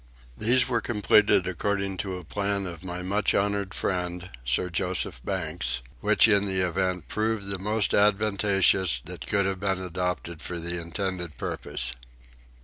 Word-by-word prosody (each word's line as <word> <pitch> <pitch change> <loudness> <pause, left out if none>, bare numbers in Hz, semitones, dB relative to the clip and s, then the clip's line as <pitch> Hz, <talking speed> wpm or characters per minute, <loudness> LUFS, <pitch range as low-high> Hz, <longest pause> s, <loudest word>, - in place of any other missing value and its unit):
These 120 - +3
were 120 -3 0
completed 105 -4 +3
according 100 +1 -1
to 95 0 -3
a 90 - -9
plan 100 +3 -2
of 85 -1 -7
my 90 0 -5
much 100 +1 +1
honoured 100 -1 0
friend, 90 0 -2
Sir - - 0
Joseph 90 -5 -2
Banks, 80 -10 -1 0.2
which - - +5
in 100 -2 +4
the 95 -1 +1
event 90 0 -1
proved 110 -1 -1
the 95 -1 -2
most 105 +2 +1
advantageous 100 - +3
that - - -7
could 100 -1 +2
have 95 -1 -1
been 95 -1 0
adopted 90 -2 -3
for 90 - -4
the 85 +1 -2
intended 85 0 -3
purpose. 60 -1 -1
95 Hz, 150 wpm, -27 LUFS, 90-100 Hz, 0.2 s, which